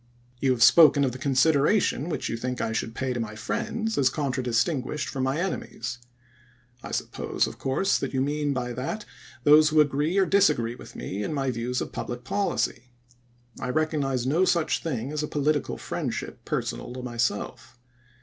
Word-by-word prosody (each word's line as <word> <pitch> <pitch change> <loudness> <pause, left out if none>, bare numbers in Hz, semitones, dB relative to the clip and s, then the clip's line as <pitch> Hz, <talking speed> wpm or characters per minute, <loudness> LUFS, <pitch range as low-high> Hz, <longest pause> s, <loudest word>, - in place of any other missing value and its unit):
"You 135 - +1
have 115 -2 +3
spoken 150 0 +7
of 130 - +1
the 130 - -8
consideration 145 +4 +2
which - - -2
you - - -2
think 125 +2 -3
I 115 - -1
should 115 0 -3
pay 130 -1 -1
to 120 - -3
my 110 -2 -4
friends 220 - -2
as 130 -2 +4
contra 135 -1 -2
distinguished 130 +4 0
from 135 -2 -3
my 135 +4 0
enemies. 125 -9 -4 0.8
I - - -8
suppose, - - -1
of - - -8
course, 135 +9 +1
that - - -3
you 130 - -1
mean 145 +2 0
by 125 -2 -2
that 205 - -4 0.4
those 150 +1 +7
who 155 - -4
agi'ee 150 +7 0
or 190 - +4
disagree 180 -13 +3
with - - -12
me 95 +11 -4
in 150 - -2
my 135 -2 0
views 125 +1 -2
of - - -4
public 120 0 -5
policy. 130 - -1 0.7
I - - -3
recognize 140 -4 0
no 155 +8 +2
such 170 -3 +1
thing 135 -4 -3
as 150 0 -2
a 150 - -2
political 150 0 0
friendship - - -5
personal 120 - -3
to 125 0 -7
myself. 120 0 -3
135 Hz, 180 wpm, -26 LUFS, 125-155 Hz, 0.8 s, spoken